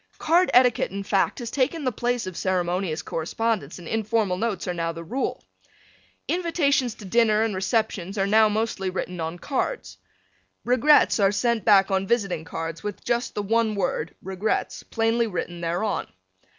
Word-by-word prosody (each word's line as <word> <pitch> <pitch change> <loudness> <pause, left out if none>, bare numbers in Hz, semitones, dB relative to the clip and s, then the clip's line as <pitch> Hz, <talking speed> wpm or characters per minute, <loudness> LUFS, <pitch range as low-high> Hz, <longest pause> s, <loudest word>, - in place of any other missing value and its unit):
Card 345 +3 +3
etiquette, 250 -1 +4
in 200 +1 -5
fact, 195 0 +1
has 235 -3 -5
taken 290 +4 0
the 255 - +1
place 245 +1 -1
of 185 -1 -6
ceremonious 180 -2 -1
correspondence 185 0 -2
and 175 -2 -10
informal 220 -2 0
notes 210 0 -2
are 180 - -1
now 165 -1 -2
the 165 0 -8
rule. 250 +11 -3 0.8
Invitations 295 -8 +1
to 210 - -11
dinner 220 +1 +3
and 225 -2 -1
receptions 195 0 -1
are 195 - +2
now 215 +2 +5
mostly 210 -3 -1
written 180 -1 -4
on 165 +1 -3
cards. 280 - -3 0.7
"Regrets" 255 +2 +4
are 195 -1 +4
sent 235 +2 0
back 200 -2 +5
on 190 0 0
visiting 195 -9 0
cards 165 0 -5
with 210 -2 -6
just 240 0 -1
the 205 - -2
one 220 +1 +1
word 175 -4 -2
"Regrets" 190 +3 -2
plainly 225 +1 0
written 175 -3 -4
thereon. 175 +5 -1
210 Hz, 165 wpm, -24 LUFS, 185-235 Hz, 0.8 s, now